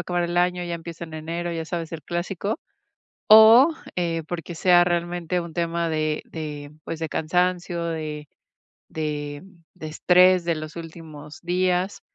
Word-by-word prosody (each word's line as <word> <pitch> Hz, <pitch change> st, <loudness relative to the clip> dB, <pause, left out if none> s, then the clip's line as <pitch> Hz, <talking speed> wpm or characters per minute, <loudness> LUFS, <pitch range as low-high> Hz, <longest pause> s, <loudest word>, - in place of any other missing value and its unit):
acabar 175 Hz, -1 st, -1 dB
el 175 Hz, 0 st, -3 dB
año, 180 Hz, 0 st, +1 dB
ya 175 Hz, -, -3 dB
empiezo 170 Hz, 0 st, -7 dB
en 160 Hz, -1 st, -11 dB
enero", 170 Hz, +2 st, -4 dB
ya 165 Hz, -1 st, -3 dB
sabes 165 Hz, -1 st, -5 dB
el 160 Hz, -, -6 dB
clásico, 180 Hz, +6 st, -3 dB, 0.7 s
o, 220 Hz, +6 st, +9 dB, 0.3 s
eh, 170 Hz, -2 st, -1 dB
porque 175 Hz, 0 st, -5 dB
sea 175 Hz, +1 st, +5 dB
realmente 175 Hz, 0 st, -1 dB
un 170 Hz, -1 st, -7 dB
tema 170 Hz, 0 st, -1 dB
de 155 Hz, -1 st, -1 dB
de, 150 Hz, -2 st, -7 dB
pues, 165 Hz, -, -5 dB
de 160 Hz, -, -2 dB
cansancio, 175 Hz, +2 st, 0 dB
de 155 Hz, -3 st, -4 dB, 0.6 s
de 145 Hz, -2 st, -4 dB, 0.3 s
de 170 Hz, -4 st, -8 dB
estrés 180 Hz, +3 st, +4 dB
de 170 Hz, -1 st, +1 dB
los 155 Hz, 0 st, -7 dB
últimos 160 Hz, -3 st, -10 dB
días, 180 Hz, +2 st, 0 dB
170 Hz, 155 wpm, -24 LUFS, 160-180 Hz, 0.7 s, o